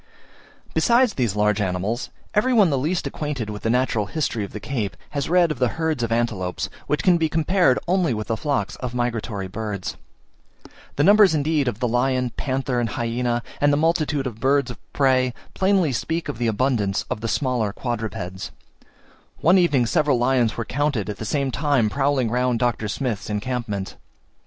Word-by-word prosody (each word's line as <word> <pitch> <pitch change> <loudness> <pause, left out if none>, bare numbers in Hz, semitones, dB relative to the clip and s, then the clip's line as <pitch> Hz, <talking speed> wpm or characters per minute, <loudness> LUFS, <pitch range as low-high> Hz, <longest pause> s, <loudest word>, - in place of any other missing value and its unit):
Besides 240 -2 +3
these 120 -6 -1
large 105 0 +2
animals, 95 +6 -2 0.2
every 235 +5 +2
one 205 -8 +5
the - - +2
least 165 +7 -1
acquainted 140 -8 -3
with 105 - -7
the 115 - -1
natural 115 -4 +1
history 120 -5 -2
of 100 - -6
the 105 - -6
Cape, 110 -5 -3
has 140 0 -2
read 175 -1 +4
of 145 - -4
the 125 - +3
herds 160 -5 0
of 115 -1 -1
antelopes, 110 -6 -1 0.2
which 150 -2 0
can 180 -2 +5
be 160 -1 +1
compared 165 -3 +3
only 180 -4 +2
with 110 -2 -2
the 115 - -1
flocks 145 +3 -1
of 125 -1 -5
migratory 115 -5 -2
birds. 105 -1 -5 1.0
The 145 - +2
numbers 205 -2 +6
indeed 150 -1 +1
of 115 -3 -2
the 125 - +1
lion, 125 +1 +1
panther, 130 -1 -2
and 120 -2 0
hyaena, 120 +2 -1 0.2
and 145 0 +4
the 145 - +2
multitude 155 -3 +1
of 115 -4 -5
birds 135 +1 +2
of - - -10
prey, 130 -2 +2 0.2
plainly 190 -5 +2
speak 160 +7 -2
of 115 - -5
the 120 - +1
abundance 110 -3 0
of 105 - -2
the 115 - -2
smaller 120 -3 0
quadrupeds: 110 -6 -4 0.9
one 180 +5 +4
evening 145 -9 +3
seven 145 +1 +2
lions 120 -2 +2
were 115 - -2
counted 130 -7 -1
at 105 - -8
the 110 - -6
same 135 +3 0
time 135 -7 +1
prowling 135 -3 +1
round 125 0 +1
Dr. 120 -2 0
Smith's 105 -2 -3
encampment. 105 -2 -3
125 Hz, 180 wpm, -23 LUFS, 110-150 Hz, 1.0 s, numbers